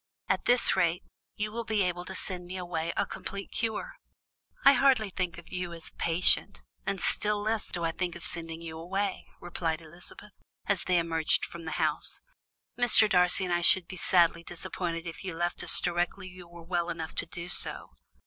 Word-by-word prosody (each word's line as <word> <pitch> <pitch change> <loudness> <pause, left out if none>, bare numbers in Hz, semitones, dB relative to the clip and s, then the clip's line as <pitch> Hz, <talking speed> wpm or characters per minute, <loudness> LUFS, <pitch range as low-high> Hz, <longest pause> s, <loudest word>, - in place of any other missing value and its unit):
At - - 0
this 245 0 +6
rate, 170 +1 +1 0.3
you 210 0 -2
will 235 +2 -4
soon 220 - 0
be 200 - +4
able 175 -1 -2
to 190 - -6
send 180 -1 -3
me 185 +1 -6
away 170 -2 -3
a - - +2
complete 200 0 -7
cure." 225 -2 -3 0.7
"I - - +9
hardly 255 -8 +3
think 180 -2 -3
of 170 - -13
you 180 -1 -4
as 165 -1 -10
a - - -31
patient 165 - +3 0.2
now, 195 - +2
and 195 - -9
still 210 +3 +1
less 215 0 -1
do 175 - -3
I 165 - 0
think 175 0 -3
of 170 - -8
sending 165 -1 -3
you 160 -1 -7
away," 195 +3 -3
returned 165 -2 -3
Elizabeth, 175 +5 -8 0.3
as 200 -3 +1
they 180 -1 +2
emerged 165 -2 +1
from 170 -1 -10
the 160 - -4
house. - - 0 0.6
"Mr. 240 -3 +6
Darcy 180 0 +4
and 180 - -1
I 175 - +1
should 175 0 +5
be 185 - -8
sadly 170 -2 +3
disappointed 170 0 -4
if 165 +2 -7
you 185 -3 -5
left 175 +1 -1
us - - +6
directly 175 +2 -1
you 180 -1 -12
were 170 0 -13
well 175 0 -1
enough 160 -2 -5
to - - +3
do 170 +1 -7
so." - - -3
175 Hz, 205 wpm, -29 LUFS, 170-190 Hz, 0.7 s, I